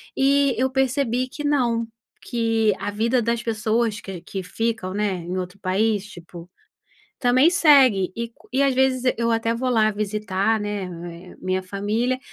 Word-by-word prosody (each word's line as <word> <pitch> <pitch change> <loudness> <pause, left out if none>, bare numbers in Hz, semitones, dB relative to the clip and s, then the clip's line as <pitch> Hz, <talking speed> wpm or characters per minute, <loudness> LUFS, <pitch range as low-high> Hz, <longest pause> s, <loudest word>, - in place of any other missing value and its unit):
E 275 0 +3
eu 260 +2 +1
percebi 260 -1 0
que 295 +3 -8
não, 240 -6 +1 0.3
que 225 -2 +1
a 205 - -3
vida 230 +4 +1
das 235 +1 0
pessoas 225 -1 0
que 185 -3 -8
que 190 -2 -6
ficam, 200 -1 -3
né, 210 -1 0
em 175 +1 -5
outro 180 +1 -5
país 205 +2 0
tipo, 175 -3 -12 0.7
também 255 +4 +4
segue. 265 - +5
E 235 0 -4 0.2
e 270 +2 +2
às 270 -2 +2
vezes 260 -1 +2
eu 235 0 0
até 230 0 +1
vou 255 +2 -2
lá 215 -3 +3
visitar, 210 0 -1
né, 180 -4 -6
minha 185 0 -1
família, 210 +7 -1
225 Hz, 155 wpm, -23 LUFS, 195-250 Hz, 0.7 s, segue